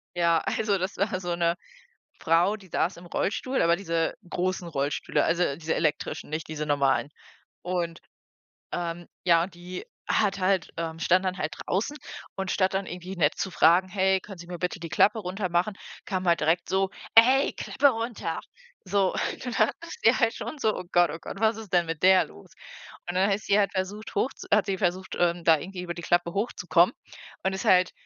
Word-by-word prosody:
Ja, 170 Hz, -1 st, +3 dB
also, 210 Hz, -2 st, +1 dB
das 185 Hz, +2 st, -3 dB
war 195 Hz, -1 st, 0 dB
so 175 Hz, -2 st, -2 dB
'ne 170 Hz, 0 st, +1 dB, 0.7 s
Frau, 170 Hz, +6 st, +3 dB
die 195 Hz, -3 st, -16 dB
saß 170 Hz, +1 st, -1 dB
im 175 Hz, -, -12 dB
Rollstuhl 255 Hz, +9 st, -1 dB
aber 170 Hz, +1 st, +4 dB
diese 165 Hz, -3 st, -1 dB
großen 180 Hz, 0 st, -2 dB
Rollstühle, 145 Hz, -2 st, 0 dB
also, 170 Hz, -4 st, +1 dB
diese 160 Hz, 0 st, -2 dB
elektrischen, 150 Hz, -2 st, -2 dB
nicht 155 Hz, +1 st, -3 dB
diese 155 Hz, -1 st, -4 dB
normalen. 140 Hz, -1 st, +2 dB, 0.5 s
Und, 175 Hz, -2 st, -2 dB, 0.7 s
ähm, 175 Hz, 0 st, -4 dB, 0.2 s
ja 170 Hz, -2 st, +5 dB
und 180 Hz, +1 st, -7 dB
die 180 Hz, -, -8 dB, 0.2 s
hat 200 Hz, -2 st, +1 dB
halt 185 Hz, -1 st, +1 dB
ähm, 165 Hz, -1 st, -4 dB
stand 185 Hz, +3 st, +3 dB
dann 185 Hz, 0 st, -2 dB
halt 155 Hz, -3 st, -3 dB
draußen 210 Hz, +10 st, -1 dB, 0.4 s
und 190 Hz, -1 st, -3 dB
statt 190 Hz, -1 st, +1 dB
dann 195 Hz, 0 st, -1 dB
irgendwie 180 Hz, +2 st, -7 dB
nett 160 Hz, -3 st, +2 dB
zu 190 Hz, -, -2 dB
fragen: 175 Hz, +2 st, +5 dB
„Hey, 190 Hz, 0 st, +2 dB
können 195 Hz, 0 st, -11 dB
Sie 170 Hz, 0 st, -11 dB
mir 175 Hz, 0 st, -6 dB
bitte 180 Hz, 0 st, -2 dB
die 165 Hz, -1 st, -6 dB
Klappe 215 Hz, +7 st, +3 dB
runtermachen“, 185 Hz, 0 st, -1 dB, 0.3 s
kam 185 Hz, -2 st, -2 dB
halt 170 Hz, -1 st, +4 dB
direkt 165 Hz, +3 st, +1 dB
so: 190 Hz, 0 st, +1 dB, 0.3 s
„Ey, 255 Hz, +5 st, +6 dB
Klappe 285 Hz, -, +2 dB
runter!“ 230 Hz, -2 st, -3 dB, 0.5 s
So. 195 Hz, 0 st, +1 dB
Und -, -, -3 dB
dann 250 Hz, -, -3 dB, 0.2 s
dachte 335 Hz, -, -9 dB
ich 225 Hz, +3 st, +4 dB
halt 230 Hz, 0 st, +3 dB
schon 310 Hz, -, -6 dB
so: 220 Hz, -6 st, +1 dB
„Oh -, -, -5 dB
Gott, 175 Hz, -1 st, +4 dB
oh 165 Hz, -, -6 dB
Gott, -, -, -7 dB
was 220 Hz, +1 st, +3 dB
ist 220 Hz, -4 st, -9 dB
denn 175 Hz, -1 st, +3 dB
mit 165 Hz, 0 st, -5 dB
der 185 Hz, 0 st, +6 dB
los?“ 80 Hz, +1 st, -16 dB, 0.6 s
Und 175 Hz, -, -4 dB
dann 195 Hz, +2 st, +3 dB
ist 200 Hz, +2 st, -1 dB
sie 200 Hz, -, +3 dB
halt 200 Hz, -, +2 dB
versucht, 200 Hz, +3 st, -4 dB
hoch 240 Hz, +6 st, +1 dB
zu -, -, -11 dB
hat 210 Hz, 0 st, +4 dB
sie 195 Hz, -1 st, -1 dB
versucht, 185 Hz, -1 st, -1 dB
ähm, 175 Hz, 0 st, +1 dB
da 160 Hz, -1 st, +6 dB
irgendwie 180 Hz, +3 st, -7 dB
über 170 Hz, -1 st, -4 dB
die 170 Hz, -, -8 dB
Klappe 175 Hz, 0 st, +1 dB
hochzukommen, 180 Hz, -5 st, +2 dB, 0.5 s
und 190 Hz, -, 0 dB
ist 190 Hz, -, -4 dB
halt 180 Hz, -1 st, +5 dB
180 Hz, 200 wpm, -27 LUFS, 170-195 Hz, 0.7 s, Ey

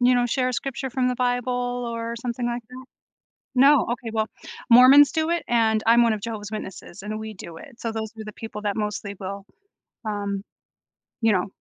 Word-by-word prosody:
you 250 Hz, +1 st, +5 dB
know, 245 Hz, 0 st, +2 dB
share 255 Hz, +1 st, 0 dB
a -, -, -2 dB
scripture 265 Hz, +1 st, -3 dB
from 250 Hz, 0 st, +1 dB
the 250 Hz, -, 0 dB
Bible 245 Hz, 0 st, -1 dB
or 230 Hz, 0 st, -4 dB
something 240 Hz, 0 st, -3 dB
like 240 Hz, 0 st, -2 dB
that? 255 Hz, +1 st, -10 dB, 0.7 s
No, 275 Hz, +1 st, +6 dB
okay, 240 Hz, -1 st, -4 dB
well, 220 Hz, -1 st, 0 dB, 0.4 s
Mormons 255 Hz, +4 st, +8 dB
do 320 Hz, 0 st, 0 dB
it, 340 Hz, 0 st, 0 dB
and 220 Hz, -2 st, +2 dB
I'm 235 Hz, +1 st, +6 dB
one 230 Hz, -, +3 dB
of 215 Hz, -, -3 dB
Jehovah's 215 Hz, -1 st, -5 dB
Witnesses, 190 Hz, -4 st, -7 dB
and 215 Hz, +1 st, -4 dB
we 220 Hz, 0 st, -6 dB
do 170 Hz, -4 st, -10 dB
it, 240 Hz, +6 st, -13 dB
so, 230 Hz, -, -3 dB
those 220 Hz, -1 st, -4 dB
are -, -, -5 dB
the 210 Hz, -, -8 dB
people 220 Hz, -1 st, -7 dB
that 205 Hz, -1 st, -1 dB
mostly 210 Hz, -1 st, -3 dB
will, 195 Hz, +1 st, -6 dB, 0.6 s
um, 200 Hz, -2 st, -3 dB, 0.8 s
you 225 Hz, -2 st, +4 dB
know, 185 Hz, -2 st, +1 dB
230 Hz, 200 wpm, -24 LUFS, 215-250 Hz, 0.8 s, Mormons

